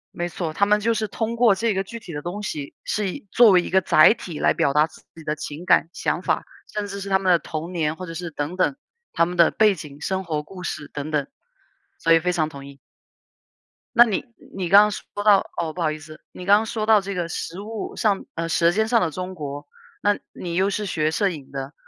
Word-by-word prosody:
没 175 - -2
错， 170 -2 -4
他 200 +6 +2
们 210 +1 +3
就 230 +2 +2
是 215 -1 -1
通 225 +3 -3
过 230 -5 +5
这 225 +2 0
个 195 0 -1
具 230 +4 -8
体 180 - -10
的 150 - -5
东 185 +6 -5
西， 145 -7 -5
是 210 -2 -1
以 190 - -8
作 235 -2 +7
为 180 -2 +6
一 - - -6
个 190 - +4
载 155 0 +6
体 170 -9 -8
来 - - +3
表 140 - +1
达 150 +1 +5
自 160 - -16
己 165 - -11
的 150 0 -2
情 155 +4 -7
感、 170 - +4
想 - - -1
法、 - - -1 0.3
甚 210 -1 -2
至 200 0 -6
是 195 - -6
他 190 - +4
们 190 -1 +1
的 170 - +5
童 165 +2 -6
年 160 -3 -1
或 185 +2 -7
者 165 - -7
是 170 +1 -5
等 150 +3 -4
等， 185 +8 +2 0.4
他 170 - +3
们 180 +1 -5
的 170 - +6
背 215 -2 +4
景， 150 -4 -10
生 190 +2 -2
活 155 -3 -2
故 185 +2 -11
事 150 -4 -5
等 145 +2 -5
等。 145 -2 0 0.7
所 165 - 0
以 165 - +6
非 180 +2 0
常 155 -3 0
同 140 -2 -10
意。 140 0 -13 1.2
那 240 +1 +9
你 210 -4 -1 0.3
你 185 -3 -3
刚 200 +3 +9
刚 210 - +1
说 - - -6 0.2
到 205 -2 +4
哦， 160 -2 -2
不 175 - -6
好 155 - +2
意 155 - -6
思， 155 0 -13
你 180 - -9
刚 200 +2 +6
刚 220 - -3
说 220 0 -3
到 215 -1 +5
这 200 +1 -5
个 175 -3 -2
食 170 +1 -5
物 215 +1 -6
上 205 -3 +1
呃， 165 0 -2
舌 170 0 +3
尖 220 +4 +1
上 230 -1 +3
的 165 -3 0
中 185 +3 -5
国， 145 -2 -6 0.3
那 205 0 +2
你 170 -1 -6
又 190 +2 +2
是 210 +1 -2
学 155 -5 0
摄 200 +4 +1
影 145 -6 -9
的， 135 +1 -6
180 Hz, 275 characters per minute, -23 LUFS, 155-200 Hz, 1.2 s, 那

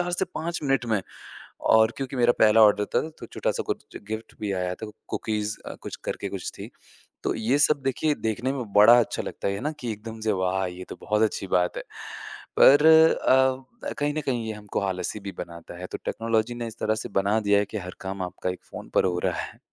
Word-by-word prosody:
4 175 0 -1
से 190 +2 +1
5 170 +1 -3
मिनट 135 -4 +1
में। 100 - +1 0.8
और 110 +1 +5
क्योंकि 135 -1 -4
मेरा 120 0 +4
पहला 110 +1 +6
ऑर्डर 105 -1 +5
था 160 - +2
तो - - -8
छोटा-सा - - -2
कुछ - - -3
ज - - -7
गिफ़्ट 110 +1 -5
भी 105 -2 -1
आया 90 -1 -1
था 110 +2 -8 0.2
कुकीज़ 105 -1 -2
अ, - - -6
कुछ - - -6
करके - - -3
कुछ - - -5
थी। - - -7 0.5
तो - - 0
ये 115 +6 +1
सब 145 0 +4
देखिए 140 +3 +1
देखने 115 +4 -2
में 130 -3 -3
बड़ा 110 +4 +8
अच्छा 115 - -2
लगता - - -4
है 100 +1 -2
ना 150 +4 -2
कि 120 -3 -2
एकदम 110 +1 -8
से 110 -1 +1
वाह! 95 0 0
ये 90 +1 -7
तो - - -6
बहुत 105 +1 +1
अच्छी 105 -2 0
बात 90 -1 +1
है। - - -3 0.8
पर 145 +3 +8
अ, 135 - +4
कहीं 145 0 0
न 155 - -1
कहीं 120 -5 -1
ये 110 - -2
हमको 105 -1 -4
आलसी 95 +1 -2
भी 100 0 -6
बनाता 85 0 -8
है, 90 - -5
तो - - -6
टेक्नोलॉजी 115 +1 0
ने 120 -1 -4
इस 110 - -11
तरह 110 - +1
से - - -5
बना 100 +3 +2
दिया 100 -1 +3
है 105 - +2
कि 105 +1 -5
हर 90 -1 -7
काम 95 0 -4
आपका 90 0 -3
एक 90 - -8
फ़ोन - - -8
पर - - +4
हो 90 -1 +1
रहा - - +1
है। - - -8
110 Hz, 230 wpm, -26 LUFS, 100-130 Hz, 0.8 s, बड़ा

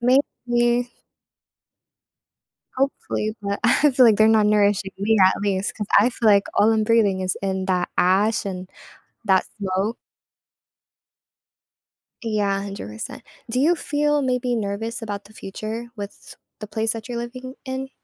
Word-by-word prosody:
Maybe. 240 -1 +1 1.9
Hopefully, 255 -5 -2
but 200 0 -3
I 295 - +4
feel, 255 -1 +5
like, 220 - +5
they're 215 - +5
not 215 -1 +4
nourishing 205 -2 +2
me 215 +3 +2
at 190 - +3
least, 200 +3 0
'cause 210 - -4
I 230 +5 +4
feel, 230 -2 +1
like, 200 -1 +5
all 220 +2 +4
I'm 220 -1 +2
breathing 210 -4 +3
is 185 -1 -1
in 190 -1 -2
that 180 -2 0
ash 200 +5 +2
and 185 -2 -5 0.6
that 190 -2 +3
smoke. 195 +3 -1 2.3
Yeah, 205 -3 0
100%. 195 - -7 0.3
Do 250 +3 0
you 335 +5 +4
feel 295 -1 0
maybe 250 -1 0
nervous 225 +3 -3
about 205 -2 -5
the 210 - -16
future 215 +3 -6
with 200 -1 -9 0.2
the 215 - -6
place 220 +2 0
that 225 +1 -8
you're 240 -1 -4
living 255 +2 -7
in? 265 0 -4
215 Hz, 145 wpm, -22 LUFS, 200-240 Hz, 2.3 s, feel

